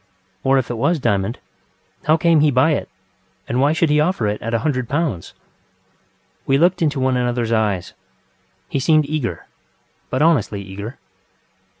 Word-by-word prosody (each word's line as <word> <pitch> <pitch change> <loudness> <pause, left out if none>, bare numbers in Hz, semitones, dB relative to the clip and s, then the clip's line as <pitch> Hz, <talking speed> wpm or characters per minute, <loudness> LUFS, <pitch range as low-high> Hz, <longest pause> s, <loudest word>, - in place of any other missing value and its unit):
Or 135 0 +3
if 130 -2 -1
it 120 - -4
was 170 +8 +2
a - - -8
diamond, 100 -1 0 0.7
how 155 +2 +4
came 165 -1 +3
he 150 0 +4
by 135 +4 +3
it, 145 - -2 0.6
and 125 +2 0
why 145 +2 +4
should 160 -1 +1
he 150 - +3
offer 155 - +1
it 105 0 -2
at 115 - -4
a 115 - +2
hundred 130 -6 -1
pounds? 140 - -2 1.1
We 135 - +3
looked 175 +4 +2
into 150 -4 +1
one 130 0 +1
anotherŌĆÖs 120 -2 -1
eyes. 105 -5 0 0.7
He - - -2
seemed 155 +2 +3
eager, 140 - -3 0.6
but 130 +3 0
honestly 130 - +2
eager. 100 +6 -8
130 Hz, 170 wpm, -20 LUFS, 115-155 Hz, 1.1 s, how